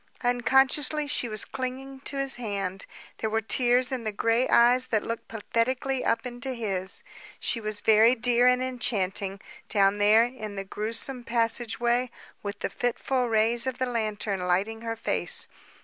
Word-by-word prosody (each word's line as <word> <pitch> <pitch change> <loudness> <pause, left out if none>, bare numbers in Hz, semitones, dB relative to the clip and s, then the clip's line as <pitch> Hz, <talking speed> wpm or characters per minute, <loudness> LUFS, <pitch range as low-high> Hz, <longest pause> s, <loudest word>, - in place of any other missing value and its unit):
Unconsciously 265 +5 +2
she 270 -4 0
was 215 -1 -1
clinging 265 +1 -6
to 280 +1 -6
his 275 -2 +1
hand. 200 -5 -4 0.3
There 220 - -1
were 220 +1 +1
tears 245 +3 +2
in 255 -3 -3
the 215 - -2
gray 230 +4 +1
eyes 245 +2 +5
that 220 -4 0
looked 230 0 -5
pathetically 250 +4 -1
up 230 +2 0
into 250 +1 -4
his. 195 -5 -1 0.4
She 230 - -1
was 215 -1 -4
very 220 +3 +5
dear 245 +1 +3
and 250 0 +3
enchanting, 200 -6 -1 0.3
down 200 -1 +3
there 210 +2 +6
in 230 -4 -6
the 195 - -4
grewsome 230 +6 -3
passageway 235 +1 +1 0.3
with 205 0 -6
the - - -1
fitful 250 +1 -1
rays 225 +3 +2
of 260 -1 -2
the 260 - 0
lantern 215 -4 -2
lighting 190 +5 0
her 230 0 -3
face. 225 - -1
230 Hz, 160 wpm, -27 LUFS, 215-255 Hz, 0.4 s, there